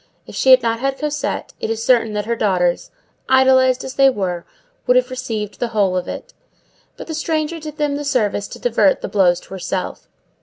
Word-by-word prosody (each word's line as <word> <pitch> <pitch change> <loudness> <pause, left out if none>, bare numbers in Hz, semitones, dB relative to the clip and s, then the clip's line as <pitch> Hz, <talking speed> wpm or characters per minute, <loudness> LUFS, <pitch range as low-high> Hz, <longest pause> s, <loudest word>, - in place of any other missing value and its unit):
If - - -12
she 265 - +1
had 255 -2 +8
not 230 0 0
had 270 +1 -1
Cosette, 300 0 -3
it - - -3
is 225 0 -2
certain 230 -4 +3
that 210 -1 -2
her 235 +1 -1
daughters, 180 -5 0 0.4
idolized 260 -1 +4
as 265 - -6
they 270 0 +5
were, 185 -7 -3 0.4
would 250 - +5
have 250 +1 +1
received 220 -5 -4
the 240 - 0
whole 205 -5 +1
of 180 -1 -2
it; - - -7 0.6
but - - -8
the 320 - -6
stranger 315 +1 -2
did 305 -1 -8
them 295 -2 0
the 290 - -4
service 220 -8 0
to - - -9
divert 220 -5 +2
the - - -3
blows 180 -4 +3
to - - -19
herself. 185 0 -5
240 Hz, 205 wpm, -19 LUFS, 205-270 Hz, 0.6 s, had